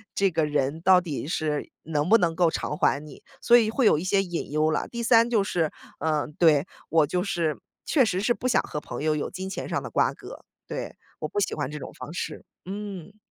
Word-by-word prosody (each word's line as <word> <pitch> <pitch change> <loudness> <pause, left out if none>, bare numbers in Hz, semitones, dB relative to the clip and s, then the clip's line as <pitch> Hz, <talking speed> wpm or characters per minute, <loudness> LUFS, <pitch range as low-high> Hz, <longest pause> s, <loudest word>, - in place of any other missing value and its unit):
这 195 -2 +2
个 160 -1 +1
人 145 +1 -1
到 185 0 +6
底 150 -5 -4
是 155 -2 -2
能 150 -1 -1
不 225 - +8
能 170 -5 +1
够 175 -2 +4
偿 150 - -3
还 140 - +2
你， 150 - -12 0.2
所 240 - +7
以 225 -2 +3
会 245 +3 +1
有 205 - +6
一 - - -4
些 195 +1 +2
隐 175 -5 -5
忧 155 +1 +2
啦。 - - -1
第 235 0 -4
三 230 0 +5
就 220 -4 +3
是， 170 -6 0 0.3
嗯， 155 -1 -1
对， 155 -3 +5 0.2
我 160 -2 +4
就 180 +4 0
是 170 -6 -1 0.3
确 270 -6 +4
实 185 -3 -1
是 240 +4 +2
不 255 - -3
想 250 - +3
和 150 - -5
朋 150 - -6
友 155 0 +2
有 150 - -2
金 190 +1 -6
钱 - - -5
上 - - -1
的 - - -6
瓜 - - +2
葛， - - -11 0.2
对， - - -5 0.2
我 - - -3
不 205 - -2
喜 205 - 0
欢 145 -3 -2
这 150 - -6
种 - - -8
方 155 - -9
式， 175 - -5 0.2
嗯。 200 0 -7
175 Hz, 255 characters per minute, -26 LUFS, 150-200 Hz, 0.3 s, 不